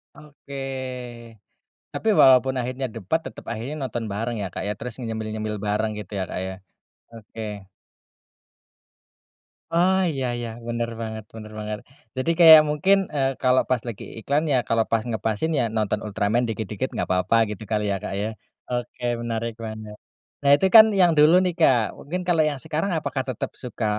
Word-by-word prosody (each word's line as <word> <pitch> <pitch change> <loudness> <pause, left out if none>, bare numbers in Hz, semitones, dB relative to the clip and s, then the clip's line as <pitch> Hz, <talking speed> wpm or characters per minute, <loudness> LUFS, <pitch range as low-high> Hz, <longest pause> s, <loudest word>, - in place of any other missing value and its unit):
Oke, 145 -2 -13 1.4
tapi 220 - -2
walaupun 130 0 +6
akhirnya 130 +2 -3
debat 115 - -1
tetep - - -8
akhirnya 120 +6 -4
nonton 120 -3 -3
bareng 115 +3 -3
ya - - -2
Kak - - -3
ya? - - 0
Terus 125 0 -5
nyemil-nyemil 110 -1 -4
bareng 110 +1 0
gitu 105 0 -9
ya 95 - -1
Kak - - -4
ya? 95 - -5 0.6
Oke. 105 -2 -8 2.1
Oh 185 +3 +3
iya 135 -3 -3
iya 120 -1 -4 0.2
bener 120 0 -2
banget 110 -1 -5
bener 110 -1 -9
banget 105 0 -4 0.4
jadi 145 +6 +1
kayak 160 -2 +10
mungkin, 185 +7 +3 0.2
eee, 135 -1 +2
kalau 130 0 +4
pas 125 -3 +1
lagi 110 -4 -6 0.2
iklan 145 +6 0
ya - - +4
kalau 115 -1 +2
pas 115 -1 +2
ngepasin 110 +8 -1
ya - - +2
nonton 105 -1 0
Ultraman 105 +3 0
dikit-dikit 110 +3 -3
nggak - - -3
papa 90 +5 +1
gitu 105 +1 -6
kali 105 -1 +1
ya - - +1
Kak - - -4
ya? 105 - -1 0.4
Oke 120 0 -4 0.2
menarik 115 0 -3
banget, 110 -1 -7 0.5
nah 140 0 +4
itu 170 - +1
kan 220 0 +12
yang 175 -2 +6
dulu 150 +3 +7
nih 180 - 0
Kak 135 -6 +5 0.2
mungkin 180 +5 -4
kalau 165 -3 +3
yang 140 -2 -5
sekarang 165 +6 -2
apakah 135 -3 -2
tetap 125 - -4
suka 120 -2 -4
120 Hz, 170 wpm, -24 LUFS, 110-140 Hz, 2.1 s, kan